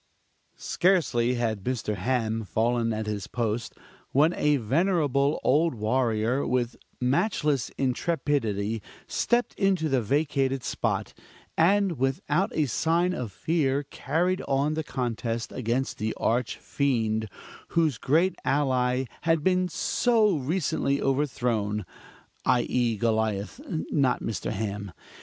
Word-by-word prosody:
Scarcely 135 -10 +2
had 110 -4 -1
Mr. 120 -3 -2
Ham 115 +1 -1
fallen 115 +2 0
at 110 0 -2
his 105 -2 -3
post, 115 -1 -2 0.4
when 155 +5 +4
a 150 -3 +2
venerable 145 - +1
old 155 +2 +3
warrior, 115 +2 +1
with 125 -1 0 0.2
matchless 140 - +1
intrepidity, 125 - 0 0.2
stepped 240 0 0
into 190 -5 +2
the 135 -3 +2
vacated 135 +1 0
spot; - - -2 0.4
and 185 -2 +3
without 145 +8 0
a 155 - +2
sign 165 +7 +1
of 120 - -4
fear 140 - 0
carried 165 +7 -1
on 140 +2 +1
the 160 0 -2
contest 115 -4 -3
against 125 +2 -2
the 110 0 -2
Arch 115 0 0
Fiend, 110 -6 0 0.4
whose 160 -7 +1
great 165 +7 +2
ally 130 -2 +1 0.2
had 165 -1 +1
been 185 0 +2
so 220 +1 +2
recently 140 -1 0
overthrown 120 -7 0 0.6
i.e., 120 -2 +1
Goliath, 110 - -1 0.3
(not 135 -4 +2
Mr. 115 - -3
Ham). 100 -2 -4
130 Hz, 115 wpm, -27 LUFS, 115-155 Hz, 0.6 s, when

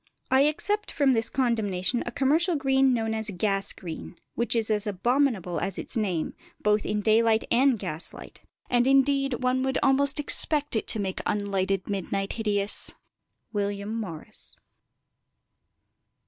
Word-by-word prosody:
I 265 +2 +5
except 415 +8 0
from 280 -3 +3
this 225 -1 0
condemnation 230 -4 0
a - - -2
commercial 315 +8 +2
green 270 -2 +3
known 225 -2 0
as 220 0 -3
gas 195 0 0
green, 170 0 -8 0.2
which 235 +1 0
is 225 -1 0
as 210 -1 0
abominable 210 -3 0
as 195 -2 -3
its - - -4
name, 190 -8 -1 0.3
both 210 0 +2
by - - -1
daylight 220 +1 +3
and 255 +1 +4
gaslight, 155 -4 -3 0.3
and 245 0 +2
indeed 275 -1 +2
one 255 +1 +2
would 265 0 0
almost 275 +1 +3
expect 295 -1 0
it 220 - -1
to 220 - +1
make 190 -2 -3
unlighted 195 -2 -1
midnight 195 0 -2
hideous. 210 -2 0 0.6
WILLIAM 205 0 -2
MORRIS. 190 -9 -8
225 Hz, 140 wpm, -26 LUFS, 200-265 Hz, 0.6 s, I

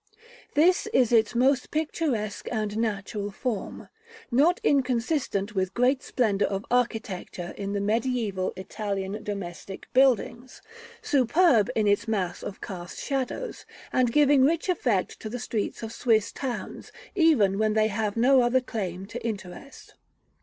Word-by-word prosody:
This 345 +5 +4
is 250 -3 +3
its 230 0 +3
most 260 +2 +2
picturesque 295 -9 -2
and 215 -3 -2
natural 205 -2 -2
form; 205 +1 -4 0.4
not 300 +9 +4
inconsistent 250 -5 0
with 190 -2 -1
great 255 +2 +2
splendor 210 -5 +1
of 195 +1 -3
architecture 220 -7 -2
in 200 0 -4
the 200 - 0
mediæval 215 -3 0
Italian 200 +1 -4
domestic 195 -1 -6
buildings, 255 -1 +2 0.4
superb 265 - +3
in 215 - +2
its 205 +3 +2
mass 195 -5 -2
of 195 - -7
cast 175 -2 -7
shadow, 275 - -2 0.4
and 250 -2 +2
giving 290 -1 +5
rich 330 +6 +1
effect 240 - 0
to 215 - -6
the 245 - -4
streets 220 -1 -3
of 225 0 -5
Swiss 220 -4 +2
towns, 260 -3 -6 0.2
even 265 - +3
when 215 0 +2
they 215 0 +3
have 210 0 -2
no 260 +3 +5
other 240 +2 +3
claim 195 -7 -5
to 205 - -8
interest. 205 +3 -7
225 Hz, 140 wpm, -26 LUFS, 200-260 Hz, 0.4 s, giving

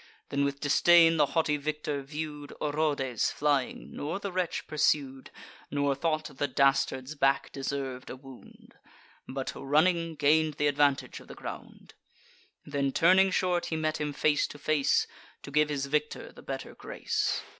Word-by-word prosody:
Then 140 0 0
with 140 0 -1
disdain 165 +3 +5
the 150 -2 +4
haughty 150 +1 +1
victor 150 0 -3
view'd 150 0 -6
Orodes 145 -5 0
flying, 145 -3 -1
nor 150 +6 -3
the 200 -1 -5
wretch 180 -2 -2
pursued, 140 -3 0 0.4
Nor 145 -1 +1
thought 155 0 -2
the 145 - 0
dastard's 135 0 +1
back 135 -2 +1
deserv'd 135 -2 -4
a - - -6
wound, 135 -1 -15 0.5
But, 135 0 -4
running, 165 +4 +1
gain'd 155 +1 +2
th' - - -6
advantage 145 -1 +1
of - - -16
the - - -10
ground: - - -9 0.7
Then 140 -1 -1
turning 185 +6 +5
short, 180 -1 0
he 160 - -2
met 155 -1 -1
him 150 -1 -1
face 145 +1 +1
to - - -10
face, 145 -1 +2 0.4
To - - -9
give 150 +1 +3
his 140 -2 -2
victory 150 +2 -2
the - - -14
better 135 -1 -6
grace. - - -2
145 Hz, 155 wpm, -29 LUFS, 140-155 Hz, 0.7 s, disdain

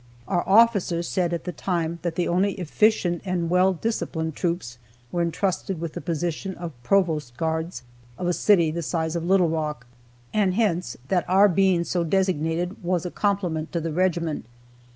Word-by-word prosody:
Our 175 -2 +1
officers 200 -6 +4
said 180 -2 0
at 170 - -2
the 180 - -4
time 170 0 -2
that 170 -1 -3
only 185 +3 +2
efficient 180 0 +1
and 175 -3 -1
well 185 +1 +4
disciplined 160 -5 -3
troops 170 -9 -3 0.3
were 175 - 0
entrusted 175 +1 -1
with 165 -1 -4
the - - -5
position 170 +4 -3
of 170 -1 -6
provost 155 -5 +1
guards 160 0 -2 0.3
of 180 - -4
a 175 - +2
city 170 -5 +4
the 170 +2 -3
size 160 0 -2
of 170 - -2
Little 180 -1 +3
Rock, 150 -6 -3 0.5
and 200 -4 +2
hence 180 - 0
that 180 -2 +1
our 195 +3 +6
being 190 -2 +3
so 175 0 -1
designated 175 0 0
was 175 0 0
a 180 - -3
compliment 180 -6 -1
to 170 - 0
the 165 -1 -3
regiment. 170 -5 0
175 Hz, 170 wpm, -24 LUFS, 160-185 Hz, 0.5 s, our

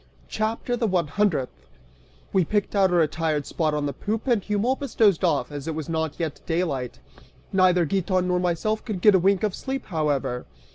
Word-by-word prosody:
CHAPTER 225 +3 -1
THE 235 -2 0
ONE 175 -6 0
HUNDREDTH. 160 - -1 0.7
(We 190 - +4
picked 205 +4 -1
out 195 -2 +4
a 180 - +1
retired 155 -2 +1
spot 155 -3 -1
on 150 -1 -1
the 140 - -2
poop 215 - -3
and 240 -5 +2
Eumolpus 235 +7 -1
dozed 200 -6 +4
off, 155 -4 +1
as 145 +1 -6
it 160 - -2
was 155 -2 -4
not 160 -2 -2
yet 160 -4 -3
daylight. 160 -7 -1 0.6
Neither 180 -2 +4
Giton 185 +2 0
nor 180 0 +1
myself 180 +5 -1
could 215 -7 -4
get 210 +1 +7
a 190 - +5
wink 195 +2 +2
of 210 -3 +1
sleep, 270 +5 -4
however. 140 -7 -1
180 Hz, 190 wpm, -24 LUFS, 155-210 Hz, 0.7 s, get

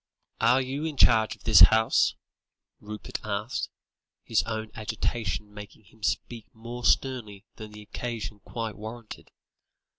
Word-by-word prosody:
"Are 120 +3 +4
you 135 +3 -3
in 155 -3 -3
charge 110 -3 +5
of - - -24
this - - +6
house?" 110 0 +6 0.6
Rupert 105 0 -7
asked, 105 +3 -3 0.5
his 115 - +2
own 110 -1 -4
agitation 105 -1 -3
making 105 +1 -11
him 110 +2 -23
speak 115 +2 -2
more 120 +2 -8
sternly 115 -9 +1
than 110 -1 -8
the 105 0 -11
occasion 110 -1 -5
quite 115 +1 -5
warranted. 110 +1 -9
110 Hz, 130 wpm, -27 LUFS, 105-120 Hz, 0.6 s, this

